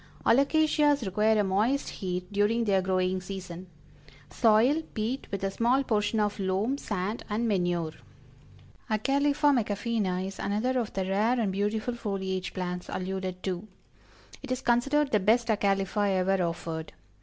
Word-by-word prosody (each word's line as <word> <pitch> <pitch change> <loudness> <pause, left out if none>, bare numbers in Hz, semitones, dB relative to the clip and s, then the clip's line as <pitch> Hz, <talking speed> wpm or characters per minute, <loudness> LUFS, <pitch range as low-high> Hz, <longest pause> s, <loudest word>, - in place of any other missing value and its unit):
Alocasias 290 +1 +3
require 215 +3 +2
a - - +1
moist 215 +9 +1
heat 180 0 -5
during 210 +3 +2
their 195 -3 +2
growing 185 0 0
season. 185 -1 -7 0.6
Soil, 235 - +4
peat, 225 +5 -2
with 195 0 -4
a 195 - 0
small 245 +6 +2
portion 215 -2 0
of 210 0 0
loam, 195 +8 0
sand 210 0 -3
and 220 +3 0
manure. 175 -5 0 1.0
Acalypha 280 +6 +2
Macafeeana 205 -5 -1
is 195 0 -7
another 230 +6 0
of 230 - -3
the 190 -1 -1
rare 215 +6 +1
and 210 -4 0
beautiful 210 +4 -1
foliage 190 -5 -3
plants 180 -1 -4
alluded 185 0 -4
to. 190 +2 -3 0.7
It - - -7
is 255 0 -1
considered 275 +5 +2
the 210 - +3
best 225 +4 +2
Acalypha 200 -1 +1
ever 190 +1 +1
offered. 165 -1 -5
205 Hz, 145 wpm, -28 LUFS, 190-235 Hz, 1.0 s, Soil